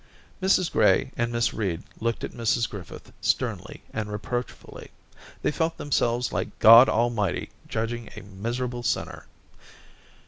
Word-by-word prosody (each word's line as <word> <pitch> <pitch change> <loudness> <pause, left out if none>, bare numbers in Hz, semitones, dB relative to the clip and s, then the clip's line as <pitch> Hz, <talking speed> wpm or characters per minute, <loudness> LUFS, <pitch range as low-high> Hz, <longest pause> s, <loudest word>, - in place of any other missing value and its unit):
Mrs 185 -2 +2
Gray 135 - +3
and 120 0 -1
Miss 115 0 0
Reed 95 -6 -2 0.2
looked 115 0 -2
at - - -4
Mrs 115 0 0
Griffith 95 -5 -10
sternly - - -2
and 105 -1 -3
reproachfully; 120 +4 -6 0.5
they - - +2
felt 160 +2 -1
themselves 125 -4 0
like - - -3
God 115 +4 +9
Almighty 110 -4 0 0.2
judging 115 +1 -3
a - - -8
miserable 120 +5 -4
sinner. 110 -3 -3
115 Hz, 130 wpm, -25 LUFS, 110-120 Hz, 0.5 s, God